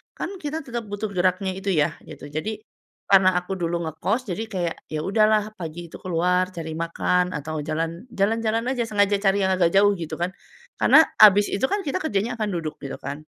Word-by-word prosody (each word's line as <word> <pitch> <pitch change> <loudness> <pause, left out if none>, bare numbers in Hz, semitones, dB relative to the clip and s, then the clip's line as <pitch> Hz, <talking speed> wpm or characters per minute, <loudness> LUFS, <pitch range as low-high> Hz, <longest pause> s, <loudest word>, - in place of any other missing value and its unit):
Kan, 385 +2 -5
kita 305 +2 -3
tetap 235 -4 -5
butuh 205 +1 -4
geraknya 185 +1 +1
itu, 195 0 -1
ya, 150 0 +1
gitu. 145 - -10
Jadi 210 +9 -4 0.5
karena 185 -2 +6
aku 180 +2 -2
dulu 170 0 -1
ngekos, 195 - -1
jadi 210 +6 -3
kayak, 180 -5 -2
ya, 155 -1 -4
udahlah 215 +1 +2
pagi 170 0 -7
itu - - -10
keluar 180 +1 +1
cari 160 -1 -5
makan 175 +2 0
atau 155 +2 -4
jalan 165 - -3
jalan-jalan 225 +1 0
aja, 240 -3 -1
sengaja 205 -2 +2
cari 200 0 +2
yang 190 - +2
agak 180 -2 +3
jauh 205 +1 +6
gitu, 165 - -5
kan. 175 +2 -2 0.5
Karena 320 - +7 0.2
abis 205 -1 +7
itu, 215 +7 +1
kan, 405 +4 -1
kita 305 +4 -2
kerjanya 235 - -2
akan 215 - 0
duduk 160 -3 -4
gitu, 140 - -6
kan. 140 +2 -5
190 Hz, 195 wpm, -24 LUFS, 170-215 Hz, 0.5 s, Karena